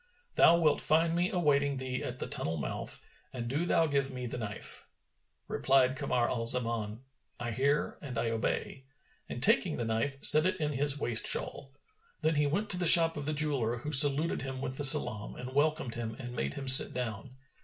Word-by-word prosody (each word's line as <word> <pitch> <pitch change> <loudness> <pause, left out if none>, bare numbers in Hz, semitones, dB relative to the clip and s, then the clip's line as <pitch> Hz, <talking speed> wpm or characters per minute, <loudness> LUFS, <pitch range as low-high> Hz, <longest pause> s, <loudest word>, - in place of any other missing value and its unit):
Thou 170 - +3
wilt 155 -3 0
find 165 +2 0
me 175 +2 -1
awaiting 140 -6 -1
thee 130 -1 -6
at - - -7
the - - -7
tunnel 80 +1 -4
mouth, 70 -4 -7 0.3
and 120 -2 -8
do 150 +8 -4
thou 165 -1 +1
give 140 -3 -2
me 125 -2 -8
the 120 +1 -7
knife." 105 -2 -5 0.6
Replied 130 -1 0
Kamar 130 -4 -2
al 115 -2 -4
Zaman, 115 -2 -1 0.4
"I 120 -1 -6
hear 140 +5 -3
and 130 -5 -9
I 115 0 -3
obey," 120 +3 -5 0.4
and 120 - -3
taking 210 -6 +3
the 120 - -5
knife 115 +5 -4
set 155 +4 +8
it 185 - -4
in 150 -1 -3
his 145 +1 -3
waist 120 -5 +2
shawl. 135 - -1 0.5
Then 160 - -1
he 150 -1 -1
went 200 +9 -3
to 180 - -2
the 175 - -1
shop 165 -1 +8
of 145 - -7
the 155 - -4
jeweller, 140 -6 -1
who 150 +6 -8
saluted 145 +3 +5
him 135 0 -8
with 130 0 -5
the - - -3
salam 115 -6 +3
and 125 +1 -10
welcomed 150 -3 -2
him 115 -1 -7
and 120 -2 -10
made 70 - -5
him 135 - -8
sit 130 -1 +7
down. 125 0 -7
135 Hz, 200 wpm, -28 LUFS, 120-150 Hz, 0.6 s, set